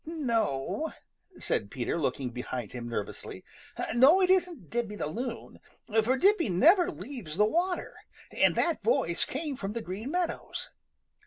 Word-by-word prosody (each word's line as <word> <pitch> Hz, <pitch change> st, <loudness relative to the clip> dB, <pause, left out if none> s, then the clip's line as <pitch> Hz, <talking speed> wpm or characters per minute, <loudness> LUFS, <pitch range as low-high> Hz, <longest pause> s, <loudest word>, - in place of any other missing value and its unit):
"No," 235 Hz, -, -1 dB, 0.5 s
said 100 Hz, -, -1 dB
Peter, 120 Hz, +1 st, -2 dB
looking 130 Hz, -3 st, -1 dB
behind 125 Hz, -2 st, -5 dB
him 120 Hz, -1 st, -6 dB
nervously. 105 Hz, -3 st, -5 dB, 0.5 s
"No, 270 Hz, +10 st, +7 dB
it 370 Hz, -1 st, +4 dB
isn't 350 Hz, -, 0 dB
Dippy 230 Hz, -3 st, -2 dB
the -, -, -3 dB
Loon, 230 Hz, -, -5 dB, 0.4 s
for 255 Hz, +4 st, +2 dB
Dippy 375 Hz, -, +4 dB
never 335 Hz, -, +5 dB
leaves 240 Hz, -, -7 dB
the 210 Hz, -, +5 dB
water, 350 Hz, -, -1 dB, 0.4 s
and -, -, +3 dB
that 335 Hz, -2 st, +1 dB
voice 475 Hz, -, +2 dB
came 300 Hz, -4 st, -4 dB
from 200 Hz, -4 st, -4 dB
the 230 Hz, -, -3 dB
Green 200 Hz, +8 st, -5 dB
Meadows. 355 Hz, +2 st, -3 dB
240 Hz, 145 wpm, -29 LUFS, -, 0.5 s, No